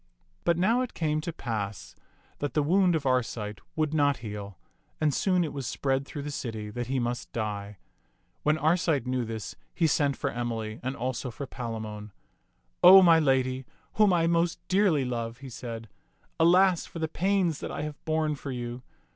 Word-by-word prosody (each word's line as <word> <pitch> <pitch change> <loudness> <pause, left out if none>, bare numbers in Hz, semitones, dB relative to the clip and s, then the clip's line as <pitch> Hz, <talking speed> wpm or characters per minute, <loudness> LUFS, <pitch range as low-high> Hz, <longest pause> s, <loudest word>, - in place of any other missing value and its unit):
But 170 -1 +3
now 225 +8 +3
it 255 - -4
came 155 -2 0
to 170 - -4
pass 110 - -5 0.4
that 145 - -3
the 150 - +3
wound 180 +3 +3
of 155 -3 -2
Arcite 115 -5 -1
would 155 -1 0
not 145 -3 +3
heal, 100 -3 -6 0.4
and 155 -2 +2
soon 180 +4 +2
it 155 - -4
was 135 -3 -4
spread 135 0 -1
through 145 - -6
the 150 - -4
city 110 -6 -5
that 120 +2 -4
he 135 +1 -1
must 120 -1 -2
die. 105 -2 -4 0.6
When 150 +1 +2
Arcite 155 -4 +2
knew 125 -1 -1
this, 110 -3 -6 0.2
he 165 - +2
sent 140 -3 +2
for - - -2
Emily 115 -2 -3
and 130 +2 -3
also 125 +1 -3
for 140 +4 -6
Palamon. 110 -5 -6 0.7
*'0 190 +1 +10
my 165 -1 +7
lady, 130 -3 +1 0.3
whom 210 -2 +4
I 170 -2 +3
most 170 0 +1
dearly 185 -8 +3
love!" 115 -2 -3
he 135 0 -10
said, 115 -2 -7 0.5
"alas 180 +2 +4
for - - -9
the 160 -1 -1
pains 180 -1 +1
that - - -5
I - - -4
have 150 -1 -7
borne 155 -1 0
for 140 -1 -7
you! 120 0 -5
140 Hz, 180 wpm, -28 LUFS, 115-160 Hz, 0.7 s, 0